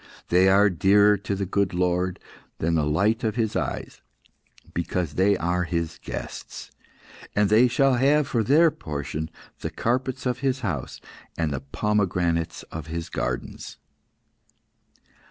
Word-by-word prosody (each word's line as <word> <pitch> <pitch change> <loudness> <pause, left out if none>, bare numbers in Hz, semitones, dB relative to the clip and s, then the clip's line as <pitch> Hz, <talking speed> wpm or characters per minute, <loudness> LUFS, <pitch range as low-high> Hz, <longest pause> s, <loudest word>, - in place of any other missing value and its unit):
They 90 +2 +5
are 100 +1 +5
dearer 100 +4 +5
to 100 +1 -3
the 100 0 -2
good 95 -1 0
Lord 90 0 0
God - - -22
than 85 +1 0
the 80 -2 +1
light 105 +10 +1
of 110 -2 0
His 110 -3 -1
eyes, - - -3 0.7
because 85 -2 -2
they 95 +3 +3
are 90 +1 0
His 85 -1 -3
guests, - - -7 0.6
and 105 -1 +2
they 115 +4 +6
shall 135 +2 +3
have 140 +3 +3
for 115 -5 0
their 155 +8 +5
portion 75 - -5 0.3
the - - -3
carpets 130 +3 -2
of 125 0 -1
His 130 -1 0
house, 80 - -4 0.4
and 80 -3 0
the 65 - -2
pomegranates 85 0 -1
of 80 -1 -6
His 85 +1 -5
gardens." 60 -1 -4
95 Hz, 145 wpm, -25 LUFS, 85-110 Hz, 0.7 s, they